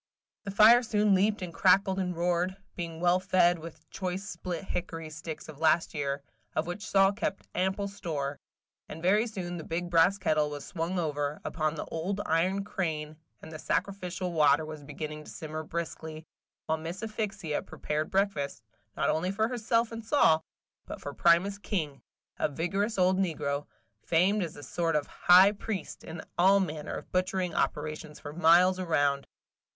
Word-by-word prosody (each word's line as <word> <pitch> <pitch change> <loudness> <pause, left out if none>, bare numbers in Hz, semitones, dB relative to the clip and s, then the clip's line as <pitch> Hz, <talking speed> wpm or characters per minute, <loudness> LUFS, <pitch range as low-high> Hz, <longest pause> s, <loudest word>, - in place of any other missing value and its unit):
The - - -4
fire 215 +5 +7
soon 210 -3 +2
leaped 200 +1 +2
and 175 -2 -6
crackled 190 +1 +4
and 180 -2 -1
roared, 175 +2 0 0.2
being 165 -2 -5
well 175 +1 +3
fed 185 -2 +3
with 160 -1 -11
choice 190 +1 -4
split 175 -1 -5
hickory 165 -4 -5
sticks 155 0 -7
of 155 -2 -11
last 160 +1 +3
year, 140 -2 -2 0.3
of 155 - +1
which 175 +5 -5
Sol 195 0 +5
kept 200 -1 -3
ample 190 +2 0
store; 155 -8 -4 0.5
and 160 - -7
very 210 +6 +3
soon 180 -5 -5
the 160 - -6
big 175 +2 -3
brass 170 +4 +5
kettle 155 -5 +1
was 145 -1 -6
swung 175 0 -3
over, 150 -3 -1
upon 155 -1 -1
the - - -4
old 185 +5 -3
iron 185 +5 +1
crane, 155 -6 -3 0.3
and 160 - -9
the 155 - -7
sacrificial 185 -2 -2
water 150 -1 +4
was 155 -1 -8
beginning 150 +1 -6
to - - -12
simmer 155 0 -6
briskly, 160 -1 -5 0.4
while 160 0 0
Miss 170 +6 -6
Asphyxia 205 -7 -3
prepared 150 +1 -3
breakfast, 190 - -1 0.3
not - - +2
only 165 +4 0
for 220 +3 0
herself 230 -1 +1
and 230 0 -6
Sol, 160 - +4 0.4
but - - -7
for 145 - -6
Primus 175 +6 +3
King, 155 -10 -3 0.4
a - - +1
vigorous 195 +9 -1
old 185 0 +3
negro, 145 -6 -1 0.4
famed 185 +5 +3
as 170 -4 -4
a 145 - -10
sort 165 +4 -1
of 150 -1 +1
high 185 +3 +6
priest 210 -1 -5
in 160 0 -7 0.2
all 195 +3 +6
manner 155 -5 -3
of - - -8
butchering 185 -1 0
operations 155 0 -2
for 145 -1 -8
miles 175 +3 +5
around. 145 -6 +1
175 Hz, 170 wpm, -29 LUFS, 155-195 Hz, 0.5 s, fire